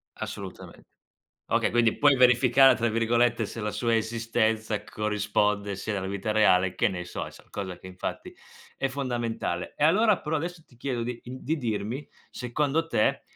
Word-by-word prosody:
Assolutamente. - - -8 0.7
Okay, - - +2
quindi 115 -1 +3
puoi 145 -1 +5
"verificare", 125 +1 +6
tra 120 0 0
virgolette, 115 +1 +2
se 115 +2 -7
la 105 - -2
sua 115 +1 +1
esistenza 110 -1 0
corrisponde 105 -1 -1
sia 105 +2 -3
nella 95 -1 -2
vita 100 +2 -2
reale, 95 -4 +4
che - - +2
ne 90 -2 -5
so, - - -5
e - - -9
so - - -16
cosa 95 -3 -5
che 95 - -12
infatti 90 0 -6 0.4
è 135 - -1
fondamentale. 120 -9 -3
E - - 0
allora 210 +4 +4
però 155 +1 -2
adesso 170 +2 -4
ti 120 - -21
chiedo 120 -1 -3
di, 120 0 -4
ehm 125 +1 -7
di 155 +6 -1
dirmi 120 +2 -3 0.2
secondo 145 +6 -1
te 105 - +1
115 Hz, 170 wpm, -27 LUFS, 105-130 Hz, 0.7 s, verificare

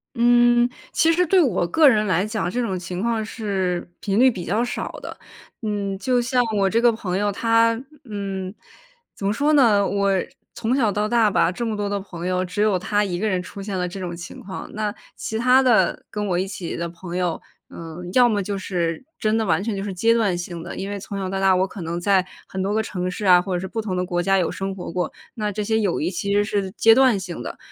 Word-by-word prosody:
嗯， 240 0 +5 0.2
其 325 +1 +3
实 360 +2 +3
对 370 +2 +4
我 195 - +1
个 305 - +5
人 215 -4 +4
来 185 +1 +2
讲， 215 -3 -2
这 245 +7 -1
种 195 -6 -2
情 180 0 -5
况 230 0 0
是 195 -6 -2
频 200 +1 0
率 260 +1 +7
比 185 -6 -6
较 220 +6 0
少 230 -1 -4
的。 - - -7 0.4
嗯， 205 -3 -2
就 250 +5 +1
像 245 +1 +2
我 195 -1 +3
这 230 +4 +2
个 240 0 +5
朋 200 -5 -3
友， 205 +1 +1
她， 230 +2 +2 0.3
嗯， 195 -4 -4 0.6
怎 195 - -6
么 200 - +2
说 285 +7 +2
呢？ 225 -8 +5
我 200 0 +1 0.5
从 235 +2 0
小 230 -6 +2
到 210 +1 0
大 230 -1 +3
吧， 180 - +2
这 235 - -5
么 220 -2 -2
多 205 -1 -1
的 200 0 -1
朋 175 -3 -8
友， 185 0 0
只 185 +3 -3
有 210 -3 +3
她 205 +3 +1
一 180 -3 -2
个 215 - 0
人 185 -2 0
出 200 - -9
现 195 -1 -4
了 180 0 -1
这 185 +2 -7
种 175 -2 -4
情 170 0 -9
况， 190 -1 -7
那 210 -1 -2 0.2
其 220 - -4
他 255 +3 +5
的 250 -4 +3
跟 210 0 -3
我 180 -2 0
一 190 - -1
起 190 -3 -5
的 170 0 -3
朋 175 +1 -8
友， 180 -2 -1 0.3
嗯， 170 +2 -8
要 250 -1 +6
么 210 -3 +1
就 200 +1 -3
是 175 -2 -2 0.2
真 215 +1 +1
的 220 - 0
完 165 -1 +1
全 220 -1 -2
就 195 - -3
是 200 -1 -4
阶 225 +6 +3
段 205 -6 +1
性 175 -1 -6
的， - - -7
因 195 - -4
为 205 0 -4
从 200 +1 -6
小 190 -1 -3
到 195 0 -2
大， 190 -1 +4
我 185 +1 +2
可 195 0 -9
能 170 +1 -3
在 190 +1 +2 0.2
很 190 - -4
多 200 +2 -1
个 220 - +2
城 180 -3 -3
市 205 +3 -5
啊， 180 -2 +7
或 185 +1 -4
者 - - 0
是 190 - -5
不 225 - -3
同 200 -4 -3
的 180 0 -1
国 175 -1 -1
家 195 +1 +3
有 175 - +1
生 195 0 -4
活 180 - -6
过， 180 +1 -2 0.2
那 210 -2 -2
这 210 +1 -3
些 220 +1 +1
友 200 -5 0
谊 160 - 0
其 200 +2 -2
实 205 0 +3
是 200 -2 -2
阶 225 +2 +5
段 260 -4 +5
性 185 -2 -6
的。 - - -6
200 Hz, 270 characters per minute, -22 LUFS, 185-225 Hz, 0.6 s, 率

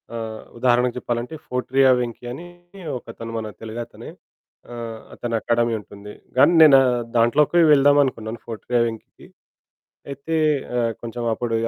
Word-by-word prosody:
ఆహ్, 110 -1 -6 0.2
ఉదాహరణకు 125 0 +2
చెప్పాలంటే 120 +5 -4
ఫోర్ట్రియా 130 +1 +2
వెంకీ 120 0 -5
అని 170 +6 -9 0.5
ఒకతను 115 -1 -9
మన 110 -1 -4
తెలుగతనే 115 +1 -8 0.6
ఆహ్, 115 -2 -7
అతనకాడమీ 120 0 -1
ఉంటుంది. 105 +1 -12 0.2
కానీ 170 +6 +6
నేను 140 -3 +8 0.4
దాంట్లోకి 145 +9 +3
వెళ్దామనుకున్నాను 135 -6 +3
ఫోర్ట్రియా 120 +1 -1
వెంకీకి 110 -1 -10 0.8
అయితే 140 +4 -4 0.4
ఆహ్, 115 -1 +1
కొంచెం 120 0 -6
అప్పుడు 115 0 -2
120 Hz, 115 wpm, -22 LUFS, 115-130 Hz, 0.8 s, నేను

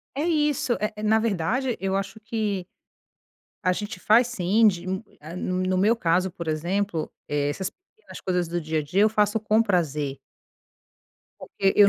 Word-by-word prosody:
É 290 - -1
isso. 295 -6 +1
Eh 210 - -1
eh, 210 - -6
na 220 +1 +4
verdade, 225 +4 0
eu 195 0 0
acho 195 +2 -3
que, 215 -4 -2 1.0
a 185 - +3
gente 205 0 -4
faz 225 +6 +5
sim, 215 -1 +3
de 180 -2 -2
um 190 +2 -2 0.2
ah, 155 +3 -9
no 185 0 -1
no 185 0 +1
meu 215 +5 +4
caso, 180 -1 +1
por 170 -2 -7
exemplo, 170 +2 -1 0.2
eh, 145 -1 0
essas 185 +6 -2
pequenas 440 +4 -15
coisas 180 -2 0
do 175 +1 -2
dia 155 0 -1
a - - -3
dia, 175 +7 0
eu 215 - +6
faço 210 0 +2
com 215 +1 +3
prazer. 150 -9 0 1.2
Porque 195 -1 0
eu 205 -1 +8
195 Hz, 180 wpm, -25 LUFS, 175-220 Hz, 1.2 s, eu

